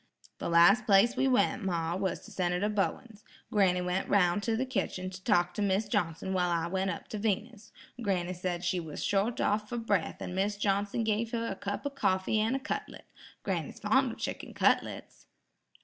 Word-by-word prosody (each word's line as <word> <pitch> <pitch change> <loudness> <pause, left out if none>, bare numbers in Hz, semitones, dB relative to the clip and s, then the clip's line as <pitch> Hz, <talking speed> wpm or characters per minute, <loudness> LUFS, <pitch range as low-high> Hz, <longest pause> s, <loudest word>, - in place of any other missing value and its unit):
"The - - -3
last 195 +8 +5
place 210 +5 +5
we 265 +1 +2
went, 260 -1 +2
ma, 170 -3 -1
was 190 0 -2
to - - -13
Senator 180 +2 0
Bowens. 210 +1 -2 0.3
Granny 185 -4 +3
went 180 +1 -2
roun' 195 0 +3
to 225 +2 0
the 260 - 0
kitchen 190 -6 -3
to 185 0 -10
talk 180 -5 +2
to 210 - -3
Mis' 200 +1 +1
Johnson 175 -1 -1
while 180 -1 +1
I 170 -1 0
went 190 +2 -1
up 170 - -5
to 215 - -4
Venus. 220 +1 -2 0.3
Granny 185 -4 -1
said 175 -1 -3
she 180 0 0
was 160 -3 -6
short 205 +4 +1
off 210 +1 0
for 240 - -3
breath 205 -7 -1
and - - -5
Mis' 200 +2 0
Johnson 205 +2 0
gave 220 +1 -1
her 230 -1 -1
a - - -3
cup 200 +4 -5
of 285 - -2
coffee 190 -4 +1
and 225 +4 +1
a - - -1
cutlet. 265 - -5 0.4
Granny's - - -3
fond - - +2
of - - -12
chicken - - -5
cutlets." - - 0
200 Hz, 195 wpm, -30 LUFS, 180-220 Hz, 0.4 s, last